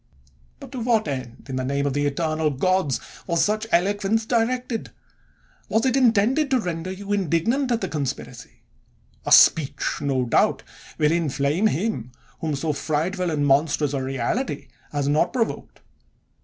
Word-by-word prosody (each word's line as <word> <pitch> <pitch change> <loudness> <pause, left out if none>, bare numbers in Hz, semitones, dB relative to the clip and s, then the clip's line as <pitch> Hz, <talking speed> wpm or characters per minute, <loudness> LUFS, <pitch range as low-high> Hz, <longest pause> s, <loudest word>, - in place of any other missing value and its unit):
But - - -11
to 255 - -5
what 225 -2 +1
end, 130 -4 -6
in 130 -1 -4
the 130 - -1
name 140 +2 -1
of 140 - 0
the 145 +1 +1
eternal 155 +1 0
gods! 150 0 +1 0.3
was 170 -1 +2
such 215 +1 -1
eloquence 205 +4 +1
directed? 245 0 -1 0.8
Was 220 +2 +1
it 260 -1 +2
intended 255 +3 +3
to 260 -2 +3
render 175 -3 -4
you 200 +2 -4
indignant 205 - +1
at 235 0 +1
the - - -1
conspiracy? 145 -4 -6 0.6
A - - -1
speech, 150 -2 +4
no 135 -3 0
doubt, 115 - +2 0.3
will 150 0 +3
inflame 160 +3 +1
him 160 - -2 0.3
whom 155 -2 -2
so 155 +2 -1
frightful 165 +6 -1
and 150 -3 0
monstrous 145 +1 +2
a 135 - -1
reality 135 - -2 0.2
has 145 -1 -1
not 150 +2 +2
provoked 230 -3 -3
165 Hz, 155 wpm, -23 LUFS, 140-220 Hz, 0.8 s, speech